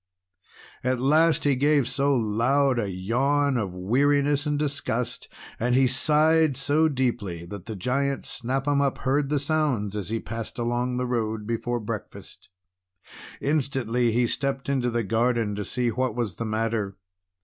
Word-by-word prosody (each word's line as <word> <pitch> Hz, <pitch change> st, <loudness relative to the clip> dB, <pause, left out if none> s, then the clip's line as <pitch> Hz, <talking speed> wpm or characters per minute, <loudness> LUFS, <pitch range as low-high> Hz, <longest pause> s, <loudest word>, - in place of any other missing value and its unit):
At 130 Hz, 0 st, 0 dB
last 155 Hz, +5 st, +3 dB
he 145 Hz, -, +3 dB
gave 145 Hz, -1 st, +3 dB
so 140 Hz, +1 st, +1 dB
loud 120 Hz, +4 st, +2 dB
a 105 Hz, -3 st, -1 dB
yawn 135 Hz, +9 st, +1 dB
of 100 Hz, -6 st, -2 dB
weariness 140 Hz, -, +2 dB
and 150 Hz, 0 st, 0 dB
disgust, 140 Hz, -5 st, -2 dB, 0.3 s
and 125 Hz, +2 st, +1 dB
he 135 Hz, +1 st, +5 dB
sighed 150 Hz, +2 st, +3 dB
so 150 Hz, +3 st, +2 dB
deeply, 115 Hz, -, -2 dB
that 100 Hz, +2 st, -9 dB
the 110 Hz, -, -5 dB
Giant 135 Hz, +6 st, -1 dB
Snap 135 Hz, +3 st, -3 dB
'Em 145 Hz, -1 st, +3 dB
Up 140 Hz, -2 st, 0 dB
heard 140 Hz, +2 st, 0 dB
the 150 Hz, -, +1 dB
sounds 140 Hz, -9 st, 0 dB
as 105 Hz, -3 st, -4 dB
he 115 Hz, +1 st, -1 dB
passed 115 Hz, 0 st, -6 dB
along 120 Hz, +1 st, -1 dB
the 125 Hz, -, -1 dB
road 110 Hz, -3 st, -2 dB
before 120 Hz, +2 st, -2 dB
breakfast. 105 Hz, -, -8 dB, 0.9 s
Instantly 130 Hz, -5 st, 0 dB
he 120 Hz, +2 st, +2 dB
stepped 135 Hz, +3 st, -2 dB
into 130 Hz, -3 st, +1 dB
the 120 Hz, -1 st, -1 dB
garden 115 Hz, +1 st, +1 dB
to 105 Hz, 0 st, -3 dB
see 125 Hz, +3 st, -1 dB
what 125 Hz, 0 st, -1 dB
was 115 Hz, -7 st, -3 dB
the 115 Hz, -, -3 dB
matter. 110 Hz, -2 st, -2 dB
125 Hz, 160 wpm, -25 LUFS, 115-140 Hz, 0.9 s, he